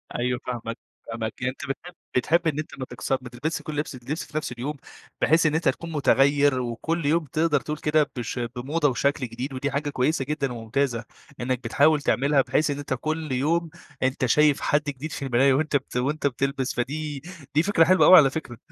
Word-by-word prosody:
أيوه، 125 0 -1
فاهمك، 115 -2 -4 0.3
فاهمك. 115 -1 -4
أنت 130 +1 -2
بتحب 175 +6 -5 0.2
بتحب 165 +7 +2
إن 155 -1 0
أنت 155 -2 -7
ما 130 - -3
تكس 120 -2 -7
ما 130 -2 0
تلبسش 150 +6 -3
كل 150 0 -6
اللبس 150 -2 -3
اللبس 130 +6 -4
في 155 - -6
نفس 150 - -3
اليوم 135 +5 -4 0.4
بحيث 160 +1 +4
إن 155 0 +2
أنت 160 -4 +2
تكون 165 +5 -4
متغير 140 -1 +3
وكل 145 +7 -2
يوم 165 +3 +2
بتقدر 155 +1 +1
تقول 150 0 -4
كده 150 0 +1
بش 120 +1 -4
بموضة 130 +6 -1
وشكل 140 +1 0
جديد 125 +4 -6
ودي 140 +2 -2
حاجة 145 +2 -1
كويسة 135 +1 0
جدًا 140 -2 -2
وممتازة 120 +1 -1 0.4
إنك 125 0 -1
بتحاول 150 +1 +3
تعملها 140 +1 +3
بحيث 150 +3 +1
إن 140 - -3
أنت 140 -2 -3
كل 155 +3 -3
يوم، 160 +6 +1 0.3
أنت 130 0 +1
شايف 150 +4 +4
حد 145 - +2
جديد 145 +2 -5
في 140 - -4
المراية 135 +1 +4
وأنت 150 +2 0
بت 135 -2 -1
وأنت 140 +4 0
بتلبس. 135 0 -1
فدي 145 +3 -3 0.3
دي 155 - +4
فكرة 185 -3 +4
حلوة 185 +3 +5
أوي 185 - +10
على 140 -4 +7
فكرة. 130 -5 -6
140 Hz, 200 wpm, -25 LUFS, 125-155 Hz, 0.4 s, أوي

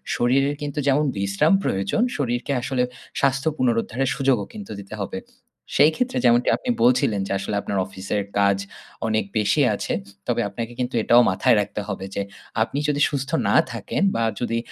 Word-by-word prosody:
শরীরের 135 +4 +2
কিন্তু 145 0 -3
যেমন 145 +2 +3
বিশ্রাম 100 - +2
প্রয়োজন, 100 - 0 0.2
শরীরকে 120 -1 -1
আসলে 125 0 0 0.4
স্বাস্থ্য 135 +2 +1
পুনরুদ্ধারের 125 +1 0
সুযোগও 135 -6 +1
কিন্তু 210 -2 -8
দিতে 100 +2 -8
হবে। 235 - -4 0.6
সেই 150 +2 +6
ক্ষেত্রে 250 0 -1
যেমনটি 120 0 +4
আপনি - - -6
বলছিলেন 120 -4 +3
যে - - -5
আসলে 100 +1 -3
আপনার 100 - -3
অফিসের 100 +2 -3 0.2
কাজ 100 -1 +4 0.5
অনেক 110 -2 +1
বেশি 105 +7 +2
আছে। - - -3 0.3
তবে 120 -1 +1
আপনাকে 115 +3 -5
কিন্তু 125 +1 -2
এটাও 120 +1 +6
মাথায় 95 +4 +3
রাখতে 105 - -4
হবে। 95 -1 -4
যে - - 0 0.4
আপনি 140 +5 -3
যদি 145 -1 0
সুস্থ 140 -1 -3 0.2
না - - +3 0.2
থাকেন 115 - -3
বা 115 - +1 0.2
যদি 115 -1 -1
120 Hz, 165 wpm, -23 LUFS, 105-140 Hz, 0.6 s, সেই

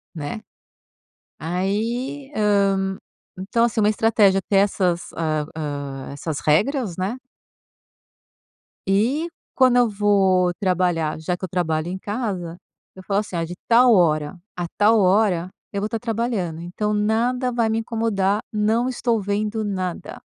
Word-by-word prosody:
Né 150 +7 -5 1.0
aí, 230 - -2
hum, 195 -2 +2 0.4
então 210 +5 +1
assim, 230 -2 +1
uma 210 - +4
estratégia 210 -3 +3
ter 200 - +2
essas 185 -3 +1
hã 155 -2 -1
hã, 140 -3 -5
essas 145 +1 -4
regras, 210 - +1
né. 190 +6 -2 1.7
E 245 +12 +2 0.3
quando 255 -2 +4
eu 245 -2 +4
vou 195 -3 +3
trabalhar, 175 -4 0
já 175 +3 -2
que 180 - -15
eu 185 - -3
trabalho 160 -2 -1
em 185 - -4
casa, 195 -6 -4 0.4
eu 185 - -11
falo 200 +1 0
assim: 205 -4 -5
"Ah, 165 - 0
de 165 +2 -5
tal 240 +1 +6
hora 160 -2 +2 0.2
a 175 - -3
tal 215 +2 +5
hora 185 -2 +2 0.2
eu 200 - -2
vou 210 - -1
estar 225 +1 -3
trabalhando, 220 -8 -2
então 210 +5 -2
nada 235 +5 +1
vai 235 -2 +1
me 220 0 0
incomodar, 220 -3 0
não 220 +3 +1
estou 235 -3 0
vendo 210 +2 -1
nada". 185 -3 -4
200 Hz, 140 wpm, -22 LUFS, 175-225 Hz, 1.7 s, tal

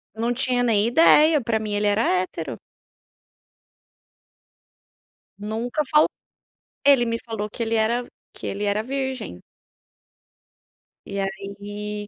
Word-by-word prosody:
Eu 220 - -6
não 235 +1 +1
tinha 250 0 0
nem 220 -4 +2
ideia, 310 +3 +5
pra 230 -1 0
mim 215 -1 -4
ele 205 0 +1
era 205 +2 +2
hétero. 175 - -1 2.8
Nunca 225 +7 -3
fal 305 0 +6 0.8
ele 275 -4 +6
me 230 0 -1
falou 215 -2 -4
que 230 - -4
ele 225 0 -1
era 230 +3 +1 0.3
que - - -7
ele 200 +1 -3
era 205 +1 0
virgem. 260 - -4 1.6
E 200 0 -5
aí, 205 +2 -5
220 Hz, 120 wpm, -23 LUFS, 205-245 Hz, 2.8 s, fal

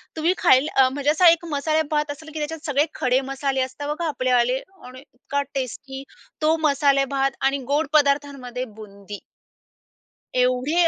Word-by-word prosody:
तुम्ही 325 +3 +1
खायल 260 +3 +4
म्हणजे 270 +2 +3
असा 350 +4 +4
एक 335 0 +2
मसालेभात 300 0 0
असेल 315 +2 -10
की 315 - -5
त्याच्यात 305 +1 -5
सगळे 290 0 +2
खडे 255 +1 +2
मसाले 270 -1 -1
असतात 260 +3 -4
बघा 325 +3 -2
आपलेवाले 255 -3 +1 0.3
आणि 255 +1 -11
इतका 285 +1 -4
टेस्टी 270 +1 -5 0.4
तो 310 +1 +3
मसालेभात 275 -1 +2
आणि 275 +1 +2 0.2
गोड 300 +1 +1
पदार्थांमध्ये 280 -4 +1
बुंदी. 205 -2 -11 1.1
एवढे 255 +7 +2
280 Hz, 140 wpm, -23 LUFS, 255-300 Hz, 1.1 s, खायल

